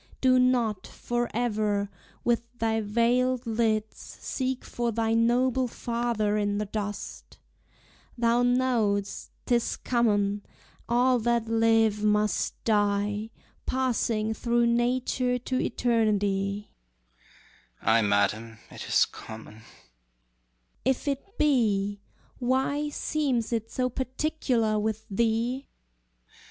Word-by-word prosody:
Do 255 -1 +4
not, 240 -6 +1
forever, 215 -4 -1 0.3
with 240 -1 +2 0.2
thy 225 -1 0
veiled 240 +4 +1
lids 220 -1 0 0.2
Seek 260 -1 -3
for 240 -1 -2
thy 225 0 0
noble 245 +2 +2
father 235 -3 -1
in 205 -1 0
the 210 - -1
dust: 205 0 -6 0.8
Thou 235 0 +3
know'st 245 -5 +1 0.2
'tis 240 -1 +1
common, 205 -4 +1 0.5
all 250 +1 +3
that 235 0 0
live 225 -2 +3
must 210 0 +1
die, 205 0 +1 0.4
Passing 230 -4 0
through 235 +1 +1
nature 250 +1 +1
to 255 +1 -2
eternity. 205 -4 0 1.1
HAMLET. 110 - +3
Ay, 115 - +5
madam, 105 +2 +1
it - - -8
is - - +4
common. 110 0 -11 1.2
QUEEN. 265 +1 0
225 Hz, 80 wpm, -27 LUFS, 205-240 Hz, 1.2 s, Ay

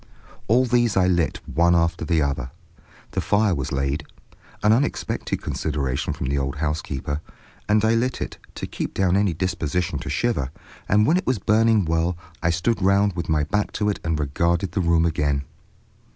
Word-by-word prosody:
All 125 +4 +4
these 120 -4 +2
I 95 - +4
lit 85 -5 +1
one 85 +1 +3
after 85 0 +1
the 80 -4 +2
other. 70 -3 -2 0.6
The - - -1
fire 105 -1 +2
was 70 0 -3
laid—an 70 +9 -2
unexpected 135 +5 -1
consideration 70 -4 -2
from - - -5
the 70 +2 0
old 70 0 -2
housekeeper—and 75 +7 -2
I 110 - +4
lit 125 +3 0
it, - - -5 0.2
to - - -4
keep - - -5
down 95 -1 +2
any 100 -4 +2
disposition 85 -2 -1
to - - -6
shiver, 115 - 0 0.4
and 105 +2 +4
when 165 +9 +4
it 185 - -3
was 130 -2 +2
burning 110 0 +3
well 80 +2 0 0.2
I 85 - +2
stood 90 +7 0
round 100 +1 +3
with 85 - -4
my 75 -1 +2
back 105 +8 -1
to 105 -1 0
it 105 - -2
and 80 -2 -1
regarded 85 +6 0
the 95 - 0
room 85 -1 +3
again. 75 -4 0
85 Hz, 175 wpm, -23 LUFS, 75-105 Hz, 0.6 s, All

